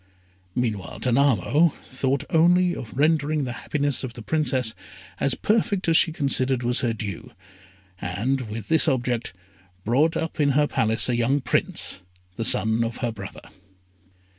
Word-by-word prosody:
Meanwhile, 105 -8 -3
Danamo 140 - +3
thought 130 +1 -1
only 175 +2 +4
of 115 - -8
rendering 150 0 +2
the 125 - -3
happiness 145 0 -1
of 125 -3 -5
the 115 - -10
Princess 130 -6 0 0.5
as 140 - +1
perfect 205 -3 0
as 165 - +3
she 160 - +5
considered 135 -4 0
was 120 +1 0
her 120 -4 0
due, 105 -5 -6 0.7
and, 115 +7 -2
with 105 -1 -6
this 160 +1 +3
object, 125 -4 0 0.5
brought 145 +9 +2
up 160 -1 -4
in 145 -2 +3
her 150 - +4
palace 110 -5 +1
a 125 - +1
young 120 +4 +1
Prince, 125 -6 -1 0.3
the 115 - -3
son 110 +1 +3
of 115 0 -4
her 120 - -1
brother. 100 -3 -9
130 Hz, 150 wpm, -24 LUFS, 115-150 Hz, 0.7 s, she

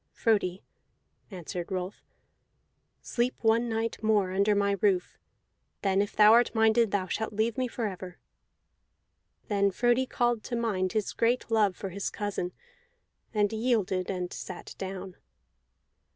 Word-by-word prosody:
"Frodi," 200 -5 +1 0.7
answered 175 -2 -6
Rolf, 185 +1 -4 1.0
"sleep 245 +1 0
one 230 +1 +3
night 225 0 -2
more 210 -4 +2
under 200 +2 +2
my 200 0 +2
roof; 190 -4 +1 0.6
then 195 0 +3
if 205 - -3
thou 210 +1 +7
art 240 +1 +4
minded 220 0 +4
thou 195 -2 0
shalt 220 +3 -3
leave 220 +2 0
me 255 -1 0
forever." 190 -7 -5 1.3
Then 200 -1 +2
Frodi 240 +5 +2
called 240 -3 0
to 240 - -3
mind 200 -6 -1
his 215 -2 -1
great 235 0 0
love 210 -4 +3
for 195 - -5
his 195 +2 -3
cousin, 205 -4 -3 0.8
and 210 -1 +1
yielded, 215 -6 0
and 180 -2 -3
sat 185 - -7
down. 190 -1 -6
205 Hz, 135 wpm, -28 LUFS, 190-225 Hz, 1.3 s, thou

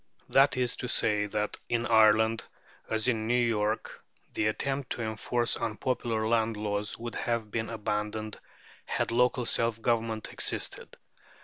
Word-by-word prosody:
That 135 0 +4
is 125 -2 0
to 125 - -3
say, 105 -3 +2
that 105 0 -2
in 120 0 0
Ireland 110 0 +4 0.5
as 110 +1 0
in 110 -3 0
New 120 +1 +3
York 110 -1 -1 0.3
the 105 - +1
attempt 135 +4 -2
to 120 - -4
enforce 115 +2 0
unpopular 115 0 -1
land 115 -1 +1
laws 105 0 -2
would 120 0 -6
have 115 -3 -2
been 110 0 -2
abandoned, 105 -1 -3 0.5
had - - -1
local 125 +1 +2
self 115 -1 0
government 115 -1 -1
existed. - - 0
110 Hz, 140 wpm, -29 LUFS, 110-120 Hz, 0.5 s, That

